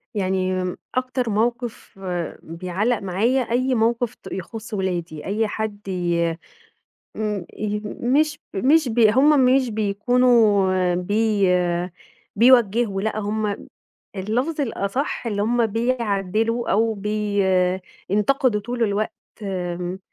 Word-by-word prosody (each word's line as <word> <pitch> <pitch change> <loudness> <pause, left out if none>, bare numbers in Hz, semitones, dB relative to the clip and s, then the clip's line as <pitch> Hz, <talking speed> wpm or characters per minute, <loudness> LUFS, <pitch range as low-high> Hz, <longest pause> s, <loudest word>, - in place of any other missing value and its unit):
يعني 185 -1 0 0.2
أكتر 255 -2 -1
موقف 235 -1 -2 0.4
بيعَلّق 185 +8 -1
معايا، 215 +8 +1
أي 255 +2 0
موقف 235 +1 +1
ت - - -15
يخص 220 +4 -7
ولادي، 175 -5 -3
أي 215 +3 0
حد 210 -1 -5
ي 170 -3 0 0.8
ام 210 -4 -2
ي 210 0 -2
مش 290 +8 0 0.2
مش 280 +6 +3
ب 230 +2 -1
هُم 260 +5 +5
مش 255 -1 +3
بيكونوا 210 -4 +3
بي 205 +2 +1 0.9
بيوَجّهوا 230 -3 +4
لأ 215 0 -1
هُم 210 0 -2 0.5
اللفظ 250 +11 -1
الأصح 240 +2 -2
اللي 205 -2 -1
هُم 235 +2 +2
بيعَدّلوا 225 -1 0
أو 225 +2 +2
ب 200 - -10 1.0
ينتقدوا 210 +1 +2
طول 240 +1 -2
الوقت 210 0 0 0.3
آمم، 180 -1 -3
215 Hz, 105 wpm, -22 LUFS, 195-240 Hz, 1.0 s, هُم